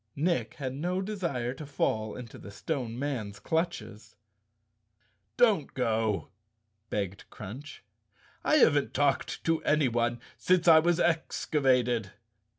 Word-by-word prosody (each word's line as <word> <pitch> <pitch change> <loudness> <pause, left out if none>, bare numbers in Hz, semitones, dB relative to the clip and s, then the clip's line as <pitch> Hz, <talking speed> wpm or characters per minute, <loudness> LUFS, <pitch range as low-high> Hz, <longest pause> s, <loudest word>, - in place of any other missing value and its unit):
Nick 170 +4 0
had 130 -3 -4
no 175 +7 -2
desire 170 - -2
to 145 - -9
fall 110 -6 -1
into 120 -3 -9
the - - -10
Stone 120 +1 -4
Man's 120 -8 -3
clutches. 160 - -3 1.2
"Don't 215 - +3
go," 110 -5 0 0.6
begged 100 -1 -4
Crunch. 125 +10 -9 0.6
"I - - +3
haven't 145 - +4
talked 140 -1 0
to 165 -1 +1
anyone 120 -5 +1 0.2
since 180 -1 +2
I 160 -1 +9
was 175 +2 +2
excavated." 130 - +1
135 Hz, 115 wpm, -29 LUFS, 115-165 Hz, 1.2 s, I